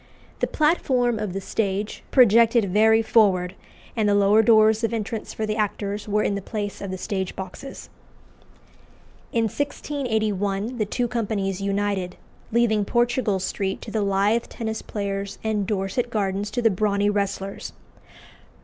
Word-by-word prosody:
The -, -, +1 dB
platform 255 Hz, -7 st, +1 dB
of 210 Hz, -4 st, -3 dB
the 195 Hz, -, -2 dB
stage 200 Hz, +1 st, -2 dB
projected 230 Hz, -4 st, +5 dB
very 220 Hz, +1 st, +5 dB
forward, 190 Hz, -5 st, +3 dB, 0.4 s
and 215 Hz, -3 st, +2 dB
the 205 Hz, -, +3 dB
lower 205 Hz, +2 st, +5 dB
doors 220 Hz, 0 st, +5 dB
of 230 Hz, +1 st, 0 dB
entrance 220 Hz, 0 st, -4 dB
for 220 Hz, -, -3 dB
the 215 Hz, 0 st, -2 dB
actors 205 Hz, -1 st, -2 dB
were 210 Hz, 0 st, +1 dB
in -, -, 0 dB
the 200 Hz, -, -3 dB
place 205 Hz, 0 st, -5 dB
of 200 Hz, -, -5 dB
the 185 Hz, -, -4 dB
stage 190 Hz, 0 st, -3 dB
boxes. 190 Hz, +8 st, -8 dB, 1.4 s
In 230 Hz, -, +1 dB
1681 220 Hz, -5 st, -2 dB
the 215 Hz, -, 0 dB
two 245 Hz, +3 st, -1 dB
companies 205 Hz, -5 st, -2 dB
united, 200 Hz, -2 st, -1 dB, 0.4 s
leaving 220 Hz, -2 st, +2 dB
Portugal 240 Hz, -1 st, +1 dB
Street 190 Hz, +1 st, -2 dB
to 220 Hz, -, -8 dB
the 220 Hz, -, 0 dB
lithe 200 Hz, +3 st, +2 dB
tennis 220 Hz, -1 st, -5 dB
players 200 Hz, -1 st, -4 dB
and 210 Hz, -3 st, -1 dB
Dorset 210 Hz, +5 st, -1 dB
Gardens 200 Hz, -2 st, -1 dB
to 245 Hz, -, -2 dB
the 225 Hz, -, +5 dB
brawny 205 Hz, +1 st, +1 dB
wrestlers. 200 Hz, -1 st, -3 dB
210 Hz, 150 wpm, -24 LUFS, 200-225 Hz, 1.4 s, projected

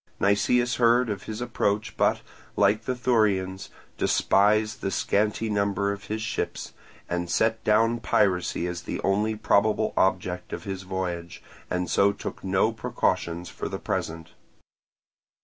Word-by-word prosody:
Nicias 120 Hz, +5 st, +2 dB
heard 120 Hz, 0 st, +4 dB
of 95 Hz, -3 st, -5 dB
his 110 Hz, +1 st, -5 dB
approach, 110 Hz, -3 st, -1 dB
but, -, -, +2 dB, 0.3 s
like 105 Hz, +2 st, +2 dB
the 130 Hz, -, -1 dB
Thurians, 100 Hz, -6 st, +1 dB, 0.3 s
despised 105 Hz, +2 st, +2 dB
the -, -, -1 dB
scanty 105 Hz, +3 st, 0 dB
number 100 Hz, -1 st, 0 dB
of 100 Hz, 0 st, -7 dB
his 110 Hz, +1 st, -3 dB
ships, -, -, -4 dB, 0.3 s
and 85 Hz, 0 st, -2 dB
set 110 Hz, +5 st, +1 dB
down 115 Hz, +2 st, +3 dB
piracy 90 Hz, -6 st, +1 dB
as 90 Hz, -1 st, -4 dB
the -, -, -5 dB
only 105 Hz, +3 st, +1 dB
probable 110 Hz, +1 st, +2 dB
object 90 Hz, -1 st, 0 dB
of -, -, -5 dB
the 100 Hz, -, -3 dB
voyage, 90 Hz, -2 st, -5 dB, 0.3 s
and 90 Hz, 0 st, -1 dB
so 100 Hz, 0 st, +3 dB
took 100 Hz, -, -7 dB
no 95 Hz, +3 st, +2 dB
precautions 90 Hz, -7 st, -1 dB
for -, -, -5 dB
the -, -, -4 dB
present. 80 Hz, 0 st, -4 dB
100 Hz, 140 wpm, -26 LUFS, 95-110 Hz, 0.3 s, heard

